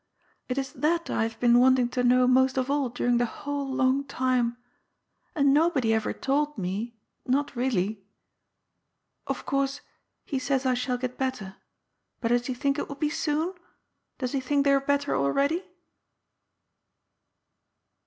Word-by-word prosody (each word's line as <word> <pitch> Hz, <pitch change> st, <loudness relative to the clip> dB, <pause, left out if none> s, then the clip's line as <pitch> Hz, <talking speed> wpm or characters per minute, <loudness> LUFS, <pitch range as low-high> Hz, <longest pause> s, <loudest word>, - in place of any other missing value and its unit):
It 250 Hz, -, -2 dB
is 270 Hz, -1 st, -3 dB
that 335 Hz, +2 st, 0 dB
I -, -, 0 dB
have 225 Hz, 0 st, -2 dB
been 240 Hz, 0 st, +5 dB
wanting 255 Hz, -1 st, +4 dB
to 250 Hz, 0 st, -1 dB
know 250 Hz, +1 st, +5 dB
most 260 Hz, +1 st, +3 dB
of 260 Hz, +1 st, 0 dB
all 285 Hz, -3 st, +1 dB
during 245 Hz, 0 st, +1 dB
the 240 Hz, -, +1 dB
whole 285 Hz, +2 st, -4 dB
long 265 Hz, +1 st, +2 dB
time. 255 Hz, -3 st, 0 dB, 0.8 s
And 280 Hz, -3 st, +4 dB
nobody 290 Hz, -7 st, +3 dB
ever 220 Hz, -1 st, 0 dB
told 290 Hz, +1 st, -1 dB
me 205 Hz, +5 st, -4 dB
— -, -, -51 dB
not 280 Hz, +2 st, 0 dB
really. 215 Hz, -5 st, -1 dB, 1.2 s
Of -, -, -4 dB
course, 275 Hz, +1 st, -1 dB, 0.4 s
he 275 Hz, -, -2 dB
says 265 Hz, +1 st, -1 dB
I 255 Hz, -, +3 dB
shall 250 Hz, 0 st, -1 dB
get 250 Hz, 0 st, -5 dB
better. 235 Hz, -8 st, -3 dB, 0.6 s
But 230 Hz, -, -1 dB
does 240 Hz, +1 st, +1 dB
ho 260 Hz, -, -1 dB
think 280 Hz, +2 st, 0 dB
it -, -, -3 dB
will 280 Hz, -, -5 dB
be 300 Hz, +1 st, -1 dB
soon? 310 Hz, +4 st, -1 dB, 0.6 s
Does 255 Hz, -2 st, -3 dB
he 275 Hz, -, 0 dB
think 280 Hz, +2 st, +1 dB
they 280 Hz, -, +5 dB
are 275 Hz, -, +4 dB
better 285 Hz, +1 st, 0 dB
already 280 Hz, -, +1 dB
260 Hz, 160 wpm, -27 LUFS, 245-280 Hz, 1.2 s, been